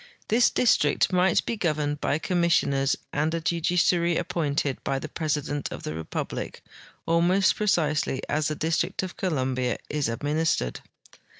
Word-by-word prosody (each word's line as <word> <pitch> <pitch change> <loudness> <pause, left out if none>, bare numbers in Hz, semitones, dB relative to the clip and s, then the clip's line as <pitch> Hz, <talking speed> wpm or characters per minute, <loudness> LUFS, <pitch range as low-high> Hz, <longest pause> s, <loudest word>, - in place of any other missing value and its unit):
This 235 +3 +4
district 180 -6 +2
might 180 0 +3
be 235 - -1
governed 150 -6 -1
by 145 - +1
commissioners 160 -5 +1 0.2
and 150 +2 +1
a - - -1
judiciary 170 +1 +1
appointed 145 -4 -1
by 135 - -1
the 145 - -5
president 145 -2 -2
of - - -7
the 75 - -4
republic, 80 0 -5 0.4
almost 175 +4 +3
precisely 155 -9 0
as 150 0 0
the 155 - -2
District 160 +4 -1
of 185 - -6
Columbia 130 -8 -1
is 150 -4 0
administered. 145 - -1
155 Hz, 135 wpm, -26 LUFS, 145-175 Hz, 0.4 s, This